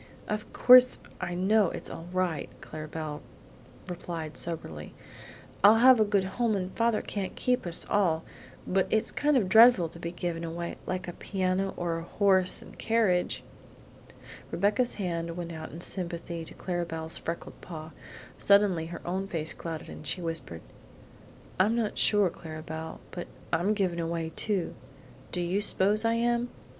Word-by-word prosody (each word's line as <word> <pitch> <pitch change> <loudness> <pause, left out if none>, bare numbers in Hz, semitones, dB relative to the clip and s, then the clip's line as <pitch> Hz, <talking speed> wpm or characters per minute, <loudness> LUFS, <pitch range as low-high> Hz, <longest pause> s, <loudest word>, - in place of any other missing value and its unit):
"Of 210 0 -4
course 255 0 +7 0.2
I 175 - -3
know 195 +1 +3
it's - - -6
all 165 - -8
right," 180 -4 -1
Clara 155 0 -8
Belle 150 -1 -5 0.7
replied 170 -3 -5
soberly. 80 - -5 0.7
"I'll 205 +2 +9
have 250 +1 +7
a - - +6
good 205 -2 +2
home 215 +3 0
and 185 -1 -4
father 230 -1 +1
can't 195 -3 -4
keep 250 -7 0
us 170 - -1
all; 170 -6 +2 0.4
but 190 0 +1
it's 220 - +2
kind 295 -1 +2
of 210 -7 +1
dreadful 220 -4 +7
to 170 - -12
be 170 0 -4
given 175 -1 -4
away, 170 +1 -5
like 185 -1 -3
a 175 - -5
piano 190 0 -1
or 170 -1 -1
a - - -7
horse 190 0 +2
and - - -15
carriage!" 220 -6 +1 1.1
Rebecca's 205 +6 +1
hand 170 -3 -3
went 170 -1 -5
out 160 -1 -7
sympathetically 170 -2 -3
to - - -7
Clara 175 -2 -2
Belle's 160 -1 -2
freckled 170 +1 -6
paw. 160 -2 -8 0.5
Suddenly 200 -5 +4
her 170 - -8
own 190 +2 -2
face 160 -4 -1
clouded 165 -2 -6
and 155 - -9
she 130 - 0
whispered: 165 - -4 1.0
"I'm 210 +5 +4
not 225 -3 -1
sure, 205 -4 +5
Clara 155 -1 -9
Belle, 160 0 -6
but 175 -1 -6 0.3
I'm 185 +6 +2
given 185 -4 0
away 165 -1 -2
too 200 -5 0 0.6
do 180 - -1
you 180 +4 0
s'pose 210 +1 +3
I 230 0 +3
am? 240 +1 +1
180 Hz, 160 wpm, -28 LUFS, 165-205 Hz, 1.1 s, I'll